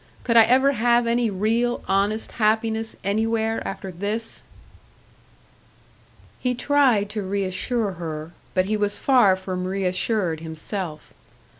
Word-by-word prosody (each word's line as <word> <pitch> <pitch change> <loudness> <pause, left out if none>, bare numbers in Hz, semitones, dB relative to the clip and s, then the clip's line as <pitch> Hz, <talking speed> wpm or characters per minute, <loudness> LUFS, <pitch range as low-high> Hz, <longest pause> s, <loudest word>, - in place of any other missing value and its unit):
Could 235 - 0
I 225 -1 +8
ever 265 +4 +4
have 240 -1 +2
any 235 0 +1
real, 225 +5 0
honest 200 +3 0
happiness 220 0 0
anywhere 220 +2 0
after 195 0 -6
this?" 205 +6 -3 2.0
He 250 -1 -1
tried 255 -6 +3
to 215 - -3
reassure 200 +3 -1
her, 160 -2 -6 0.2
but 185 0 +3
he 215 +2 -1
was 205 -1 -1
far 245 -8 +4
from 185 -1 -4
reassured 185 -1 -1
himself. 160 +1 -5
210 Hz, 120 wpm, -23 LUFS, 190-230 Hz, 2.0 s, I